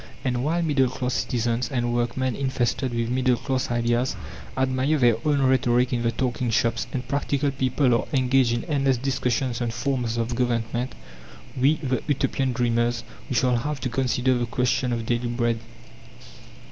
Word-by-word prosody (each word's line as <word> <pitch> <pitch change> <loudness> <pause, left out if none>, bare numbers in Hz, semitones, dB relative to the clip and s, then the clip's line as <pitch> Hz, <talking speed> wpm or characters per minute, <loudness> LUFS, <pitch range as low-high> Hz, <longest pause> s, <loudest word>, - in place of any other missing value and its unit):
And 125 -1 0
while 170 +4 +1
middle 140 -5 +2
class 125 0 -3
citizens, 120 0 -1
and 120 -2 -1
workmen 120 +1 0
infested 130 -1 -1
with 115 0 -1
middle 130 -1 +2
class 130 +2 -2
ideas 120 +1 +1 0.4
admire 130 +3 +1
their 120 -4 +4
own 145 -2 +2
rhetoric 125 -1 +3
in 120 - 0
the 115 0 +1
"Talking 125 0 -1
Shops," 115 +1 +1
and 125 -2 -4
"practical 140 +1 0
people" 130 -1 +1
are 115 - +1
engaged 130 -2 +3
in 120 0 -1
endless 135 -4 +1
discussions 125 -1 -1
on 120 - 0
forms 120 -1 -1
of 115 +1 -1
government, 120 0 -1 0.6
we, 135 +4 +3
the 130 -4 -2
"Utopian 135 -2 0
dreamers" 120 -1 0 0.3
we 130 - -2
shall 125 +1 +3
have 145 +4 -3
to 130 - -1
consider 130 +1 +1
the 120 -1 -1
question 125 +1 0
of 115 -1 -2
daily 120 +1 0
bread. 120 -1 0
125 Hz, 165 wpm, -24 LUFS, 120-130 Hz, 0.6 s, their